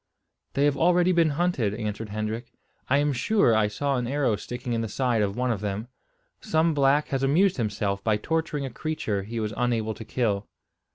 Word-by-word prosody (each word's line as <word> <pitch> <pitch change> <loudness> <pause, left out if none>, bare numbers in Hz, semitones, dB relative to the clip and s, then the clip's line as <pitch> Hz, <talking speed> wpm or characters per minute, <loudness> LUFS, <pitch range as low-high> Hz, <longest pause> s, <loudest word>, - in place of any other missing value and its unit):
"They 140 - +2
have 145 -1 +3
already 180 +2 +4
been 170 -3 +4
hunted," 135 - +1
answered 110 -1 -4
Hendrik. 110 +3 -4 0.4
"I 140 - +4
am 145 0 +2
sure 130 - +3
I 110 -1 +3
saw 140 +6 -1
an 120 -1 -2
arrow 135 -4 +1
sticking 120 +3 -5
in 115 - 0
the 115 - -2
side 120 -1 +1
of 100 0 -1
one 125 0 +1
of 105 -4 -2
them. 105 +3 -3 0.5
Some 165 -5 +1
black 145 +1 +3
has 135 -1 -1
amused 170 +8 +3
himself 100 -3 -1
by 110 -2 +2
torturing 155 +3 -2
a 135 - -5
creature 115 -7 -2
he 115 +4 -5
was 105 -1 -2
unable 115 -2 0
to 110 - -9
kill." 105 -4 -1
120 Hz, 195 wpm, -26 LUFS, 110-145 Hz, 0.5 s, already